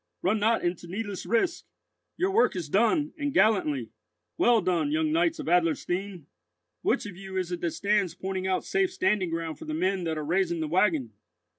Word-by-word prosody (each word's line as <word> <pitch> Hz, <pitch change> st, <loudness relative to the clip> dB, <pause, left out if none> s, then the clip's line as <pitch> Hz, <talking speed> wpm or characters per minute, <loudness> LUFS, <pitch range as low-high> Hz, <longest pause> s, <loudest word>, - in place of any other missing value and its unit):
Run 210 Hz, +4 st, +2 dB
not 225 Hz, +2 st, +2 dB
into 175 Hz, 0 st, -2 dB
needless 200 Hz, +1 st, -5 dB
risk! 235 Hz, +10 st, 0 dB, 0.5 s
Your 375 Hz, +2 st, +1 dB
work 450 Hz, -, +3 dB
is 170 Hz, -5 st, -4 dB
done, 265 Hz, -, +2 dB
and 290 Hz, -1 st, -1 dB
gallantly. 155 Hz, -, +2 dB, 0.4 s
Well 240 Hz, -1 st, +4 dB
done, 185 Hz, -, 0 dB
young 310 Hz, +1 st, +1 dB
knights 330 Hz, 0 st, +2 dB
of -, -, -6 dB
Adlerstein! 175 Hz, +1 st, 0 dB, 0.6 s
Which -, -, +1 dB
of 205 Hz, -3 st, -7 dB
you 190 Hz, 0 st, -7 dB
is 180 Hz, -1 st, -2 dB
it 175 Hz, -, -4 dB
that 170 Hz, -, 0 dB
stands 195 Hz, +1 st, 0 dB
pointing 190 Hz, 0 st, -3 dB
out 185 Hz, -1 st, 0 dB
safe 385 Hz, -2 st, +1 dB
standing 210 Hz, -, +1 dB
ground 165 Hz, -1 st, -4 dB
for -, -, -8 dB
the 310 Hz, 0 st, -3 dB
men 190 Hz, -, 0 dB
that 160 Hz, -1 st, -2 dB
are 155 Hz, -, -3 dB
raising 170 Hz, +1 st, +1 dB
the 160 Hz, -, -2 dB
waggon? 155 Hz, -, +1 dB
190 Hz, 190 wpm, -27 LUFS, 170-230 Hz, 0.6 s, Well